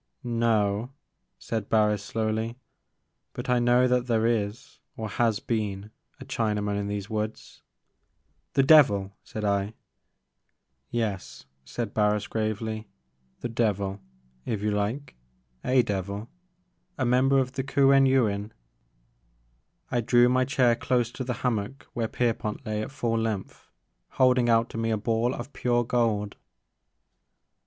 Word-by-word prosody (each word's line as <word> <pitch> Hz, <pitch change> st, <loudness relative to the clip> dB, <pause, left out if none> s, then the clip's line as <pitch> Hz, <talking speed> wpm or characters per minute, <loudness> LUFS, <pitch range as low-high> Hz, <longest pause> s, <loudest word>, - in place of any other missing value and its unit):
No," 115 Hz, -2 st, +1 dB, 0.5 s
said 110 Hz, -3 st, -4 dB
Barris 105 Hz, -2 st, +3 dB
slowly; 110 Hz, +2 st, -2 dB, 0.8 s
but -, -, -3 dB
I 125 Hz, -, +4 dB
know 120 Hz, +1 st, +4 dB
that 125 Hz, 0 st, +1 dB
there 115 Hz, -2 st, +2 dB
is, 115 Hz, +1 st, -2 dB, 0.2 s
or 110 Hz, -, -3 dB
has 110 Hz, 0 st, +1 dB
been, 105 Hz, -3 st, -3 dB, 0.3 s
a -, -, -9 dB
Chinaman 105 Hz, -2 st, -1 dB
in 100 Hz, 0 st, -2 dB
these 100 Hz, -1 st, -3 dB
woods." 110 Hz, 0 st, -5 dB, 0.5 s
'* -, -, -45 dB
The 135 Hz, -, +5 dB
devil!" 105 Hz, -10 st, +5 dB
said 110 Hz, -1 st, -5 dB
I. 100 Hz, +1 st, 0 dB, 1.1 s
"Yes," 110 Hz, -5 st, -3 dB, 0.2 s
said 110 Hz, -, -4 dB
Barris 105 Hz, -1 st, +2 dB
gravely; 110 Hz, 0 st, -3 dB, 0.5 s
"the -, -, -2 dB
devil, 105 Hz, -4 st, -1 dB, 0.4 s
if 105 Hz, -, -3 dB
you 105 Hz, -, +1 dB
Uke, 130 Hz, +8 st, -5 dB, 0.3 s
— 60 Hz, 0 st, -42 dB, 0.2 s
a -, -, +6 dB
devil, 100 Hz, +1 st, -4 dB, 0.3 s
— 180 Hz, -, -46 dB
a 130 Hz, -, 0 dB
member 130 Hz, +3 st, +3 dB
of 130 Hz, -1 st, +1 dB
the 135 Hz, 0 st, -3 dB
Kuen 135 Hz, 0 st, +4 dB
Yuin." 110 Hz, -5 st, +1 dB, 1.4 s
I 120 Hz, -, +1 dB
drew 120 Hz, +1 st, +5 dB
my 130 Hz, +1 st, +3 dB
chair 125 Hz, -3 st, +3 dB
close 120 Hz, -1 st, 0 dB
to 130 Hz, -, -5 dB
the 125 Hz, 0 st, -2 dB
hammock 120 Hz, +2 st, -2 dB
where 115 Hz, -2 st, -1 dB
Pierpont 115 Hz, -3 st, -2 dB
lay 105 Hz, 0 st, -2 dB
at -, -, -4 dB
full 120 Hz, -5 st, -1 dB
length, 110 Hz, -4 st, -4 dB, 0.4 s
holding 125 Hz, -2 st, +4 dB
out 115 Hz, 0 st, +4 dB
to 115 Hz, -, -5 dB
me 115 Hz, 0 st, 0 dB
a 110 Hz, -, +1 dB
ball 115 Hz, +3 st, 0 dB
of 120 Hz, +4 st, -8 dB
pure 120 Hz, -1 st, +1 dB
gold. 110 Hz, -4 st, 0 dB
115 Hz, 140 wpm, -27 LUFS, 105-125 Hz, 1.4 s, a